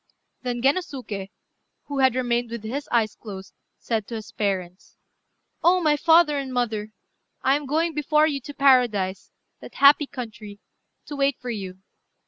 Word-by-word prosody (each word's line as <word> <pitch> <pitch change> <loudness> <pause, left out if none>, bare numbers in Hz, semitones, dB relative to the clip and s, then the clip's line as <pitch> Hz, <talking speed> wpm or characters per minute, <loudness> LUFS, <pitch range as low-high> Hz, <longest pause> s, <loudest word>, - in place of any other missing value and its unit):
Then 245 -2 -3
Gennosuké, 265 - -1 0.5
who 285 -1 -5
had 260 -2 +4
remained 240 -2 0
with 235 -1 -6
his 270 +6 -5
eyes 220 -3 +2
closed, 195 -3 -10 0.2
said 220 -3 -2
to 235 - -6
his 220 -2 -8
parents 185 -3 -4 0.7
"Oh! 360 +2 +5
my 305 -4 +3
father 320 -1 +4
and 270 -1 -5
mother, 220 -4 -2 0.5
I 270 +1 +4
am 290 -1 -4
going 325 +4 0
before 300 +1 +2
you 285 -3 -1
to 290 +3 -9
paradise, 235 -9 +2 0.3
that - - -12
happy 285 +1 +6
country, 220 -5 -8 0.5
to 295 - -7
wait 280 -1 +1
for 245 -1 -5
you. 190 -3 -7
250 Hz, 155 wpm, -24 LUFS, 215-285 Hz, 0.7 s, happy